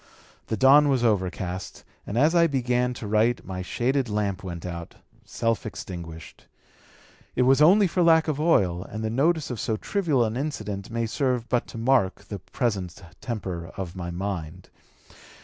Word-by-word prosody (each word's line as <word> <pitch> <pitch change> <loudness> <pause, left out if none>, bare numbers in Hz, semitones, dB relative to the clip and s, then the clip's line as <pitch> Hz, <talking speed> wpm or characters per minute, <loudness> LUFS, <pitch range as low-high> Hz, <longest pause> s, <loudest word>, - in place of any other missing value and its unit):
The 110 - -2
dawn 145 +5 +6
was 130 -3 +2
overcast, 95 -4 -2 0.2
and 105 - -3
as 150 +6 +4
I 170 -1 +5
began 125 -3 0
to 115 - -7
write 110 +3 +1
my 95 -1 -5
shaded 125 +6 -1
lamp 105 -2 -1
went 85 -2 -6
out, 85 -1 -7 0.3
self 115 -1 -1
extinguished. 85 -6 -8 0.9
It 125 - +3
was 135 +3 +4
only 195 +7 +7
for 180 0 0
lack 165 -1 +5
of 150 -2 -1
oil, 95 - +2
and 110 +3 -6
the 110 - -1
notice 150 +4 +1
of 120 - -4
so 110 +1 -1
trivial 155 - +1
an 110 +1 -3
incident 105 -8 -4
may 115 0 -1
serve 125 0 -1
but 120 -1 0
to - - -9
mark 115 -5 +1
the 100 - -7
present 95 -4 -3 0.2
temper 95 -8 -4
of 95 -2 -5
my 90 -2 -5
mind." 90 -2 -5
115 Hz, 165 wpm, -25 LUFS, 95-135 Hz, 0.9 s, only